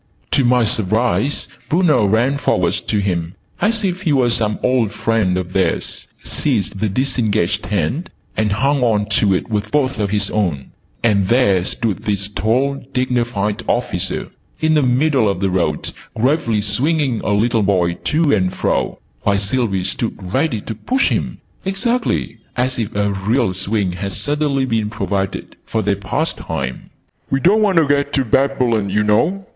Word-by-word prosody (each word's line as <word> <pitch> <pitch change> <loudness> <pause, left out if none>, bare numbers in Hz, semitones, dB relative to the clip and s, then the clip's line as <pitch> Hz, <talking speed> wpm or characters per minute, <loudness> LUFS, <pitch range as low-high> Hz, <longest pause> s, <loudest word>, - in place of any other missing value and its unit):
To 135 - +3
my 125 0 +4
surprise, 115 +5 0 0.2
Bruno 150 - +3
ran 120 +7 +2
forwards - - +1
to - - -1
him, 90 -4 -1 0.3
as 220 0 +1
if 185 0 -2
he 170 -6 0
were 130 -4 +3
some 105 -2 0
old 125 -5 +2
friend 105 -4 +1
of 90 0 -4
theirs, 90 -4 -1 0.2
seized 110 -8 -1
the 110 +1 0
disengaged 110 -4 0
hand 105 - -1 0.3
and 110 -1 +1
hung 135 +6 +1
on 110 -4 +2
to 100 -2 +3
it 110 - -3
with 105 0 -1
both 135 -5 +1
of 100 -2 0
his 100 -1 0
own: 85 -11 -1 0.3
and 100 -5 +3
there 100 -6 +3
stood 110 +2 -2
this 100 -1 -2
tall 130 +7 0
dignified 120 -5 0
officer - - -1 0.3
in 155 0 +2
the 150 - +4
middle 130 -2 +2
of 100 - -2
the 95 -1 0
road, 85 -5 -1 0.2
gravely 115 -3 +1
swinging 130 +4 0
a - - -1
little 115 +2 +2
boy 90 -4 +2
to 155 +2 +2
and 95 -3 +1
fro, - - 0 0.2
while 100 -1 +2
Sylvie 100 -2 0
stood 115 +4 -3 0.2
ready 135 -6 +1
to 110 - -5
push 255 - 0
him, - - -2 0.2
exactly 195 - -1 0.2
as 125 +1 0
if 110 -2 -3
a 100 0 +1
real 105 +2 +1
swing 100 0 -1
had 100 +2 -5
suddenly 145 -2 0
been 110 -4 0
provided 100 -3 -3
for 110 -1 -2
their 100 0 +1
pastime. 80 - -3 0.4
"We 135 - +1
don't 200 +8 +4
want 200 -4 +2
to 165 - +6
get 140 0 +1
to 135 -2 +1
Babylon, 120 -4 +1
oo 105 +2 +2
know!" 160 - +1
110 Hz, 165 wpm, -18 LUFS, 100-135 Hz, 0.4 s, to